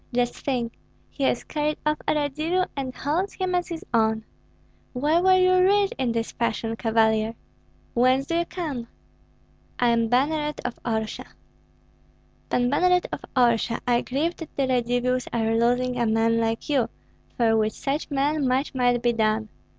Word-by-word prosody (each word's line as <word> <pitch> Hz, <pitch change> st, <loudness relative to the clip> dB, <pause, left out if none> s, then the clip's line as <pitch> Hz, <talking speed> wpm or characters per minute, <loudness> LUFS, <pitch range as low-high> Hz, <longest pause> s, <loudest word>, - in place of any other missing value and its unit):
Just 245 Hz, -1 st, 0 dB
think! 245 Hz, -4 st, -1 dB, 0.4 s
he 280 Hz, -, -4 dB
has 245 Hz, -, +1 dB
carried 300 Hz, 0 st, -2 dB
off 300 Hz, 0 st, +1 dB
a -, -, +2 dB
Radzivill 310 Hz, +5 st, 0 dB
and 265 Hz, -2 st, -4 dB
holds 340 Hz, +8 st, -1 dB
him 370 Hz, -1 st, -2 dB
as 355 Hz, -1 st, 0 dB
his 335 Hz, -2 st, -6 dB
own. 220 Hz, -1 st, +2 dB, 0.7 s
Where 300 Hz, +6 st, +2 dB
were 375 Hz, 0 st, +5 dB
you 370 Hz, 0 st, +4 dB
reared 400 Hz, +2 st, +3 dB
in 255 Hz, -3 st, +1 dB
this 230 Hz, 0 st, -2 dB
fashion, 225 Hz, -1 st, -2 dB
Cavalier? 220 Hz, 0 st, +1 dB, 0.6 s
Whence 255 Hz, +3 st, +3 dB
do 335 Hz, +3 st, 0 dB
you 340 Hz, -, 0 dB
come?" 290 Hz, -12 st, -5 dB, 0.9 s
"I 245 Hz, -, +3 dB
am 230 Hz, -1 st, +2 dB
banneret 295 Hz, +5 st, 0 dB
of 240 Hz, -, -4 dB
Orsha." 220 Hz, -2 st, -3 dB, 1.2 s
"Pan 245 Hz, 0 st, +2 dB
Banneret 360 Hz, +4 st, +3 dB
of -, -, -4 dB
Orsha, 235 Hz, -2 st, +2 dB
I 240 Hz, -1 st, +2 dB
grieve 310 Hz, +7 st, -1 dB
that 325 Hz, -, -8 dB
the 275 Hz, -, +1 dB
Radzivills 250 Hz, 0 st, 0 dB
are 225 Hz, -1 st, 0 dB
losing 245 Hz, +2 st, +1 dB
a 235 Hz, -, +2 dB
man 225 Hz, +1 st, +2 dB
like 225 Hz, 0 st, -1 dB
you, 275 Hz, -5 st, +1 dB, 0.5 s
for 225 Hz, -2 st, +3 dB
with 215 Hz, -1 st, +1 dB
such 285 Hz, +3 st, -3 dB
men 285 Hz, 0 st, +1 dB
much 260 Hz, +3 st, 0 dB
might 245 Hz, -2 st, +1 dB
be 240 Hz, -1 st, +3 dB
done. 215 Hz, -1 st, 0 dB
250 Hz, 165 wpm, -25 LUFS, 230-300 Hz, 1.2 s, were